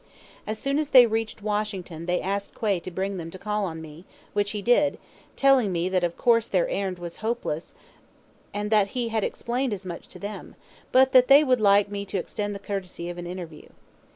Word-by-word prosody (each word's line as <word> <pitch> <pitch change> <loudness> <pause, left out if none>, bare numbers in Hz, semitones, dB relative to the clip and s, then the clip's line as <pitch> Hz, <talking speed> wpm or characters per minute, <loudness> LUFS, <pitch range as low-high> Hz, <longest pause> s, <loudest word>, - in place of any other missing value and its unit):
As 215 +1 -2
soon 275 +5 0
as 305 -2 -2
they 255 -3 +9
reached 225 -1 -3
Washington 200 -6 -3
they 180 0 +1
asked 200 +1 -3
Quay 205 -5 +1
to 170 - -7
bring 190 +2 -3
them 165 -2 -6
to 190 - -9
call 210 +1 -2
on 160 -3 -6
me, 155 +2 -11 0.3
which 205 0 +1
he 205 -1 -4
did, 265 +6 +3 0.4
telling 270 -7 +4
me 175 +1 0
that 185 -1 +1
of 170 -1 -1
course 230 -1 +3
their 180 -3 +1
errand 190 -2 -2
was 175 -1 -8
hopeless 220 -8 -3 0.8
and 210 +1 -3
that 210 -2 +4
he 240 -2 0
had 220 -2 -1
explained 245 0 -2
as 195 -1 -6
much 175 -2 -7
to - - -12
them, 205 +1 -7 0.4
but 260 +1 +5
that 255 -1 +6
they 280 +2 +8
would 255 -5 +2
like 200 0 +5
me 200 0 -3
to 195 - -3
extend 205 +2 -3
the 200 - -11
courtesy 185 -3 -4
of 175 - -8
an 175 - -6
interview. 175 -4 -8
205 Hz, 210 wpm, -25 LUFS, 180-225 Hz, 0.8 s, they